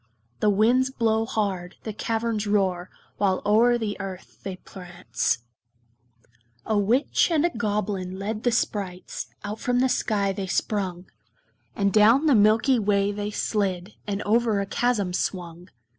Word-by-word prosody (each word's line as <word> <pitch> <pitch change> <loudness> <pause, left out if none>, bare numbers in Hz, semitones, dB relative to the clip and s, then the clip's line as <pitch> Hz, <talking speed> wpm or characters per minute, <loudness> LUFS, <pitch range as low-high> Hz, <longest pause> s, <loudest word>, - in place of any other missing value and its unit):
The 210 - +3
winds 235 +6 +3
blow 225 -3 0
hard, 190 -5 -2
the 220 - -5
caverns 225 -1 -2
roar, 185 -3 0 0.3
While 190 -2 +1
o'er 230 +4 +4
the 220 -3 -3
earth 190 -2 -8
they 195 -2 -5
prance. 175 - -3 1.2
A 220 - 0
Witch 225 - +2
and 325 -1 +2
a 345 - +1
Goblin 205 -4 -2
led 210 +2 -4
the 245 - +1
sprites; 195 -5 -3 0.2
Out 210 +1 -5
from 245 0 0
the 260 +1 +3
sky 205 -5 0
they 195 0 -4
sprung; 185 -2 -2 0.7
And 200 -1 +1
down 225 +8 +5
the 300 - +5
milky 220 +4 +4
way 200 -1 +1
they 205 0 -3
slid, 200 -3 -2
And 205 0 -2
over 225 -1 +2
a 200 - -1
chasm 205 -3 0
swung. 175 -1 -4
205 Hz, 145 wpm, -25 LUFS, 190-225 Hz, 1.2 s, down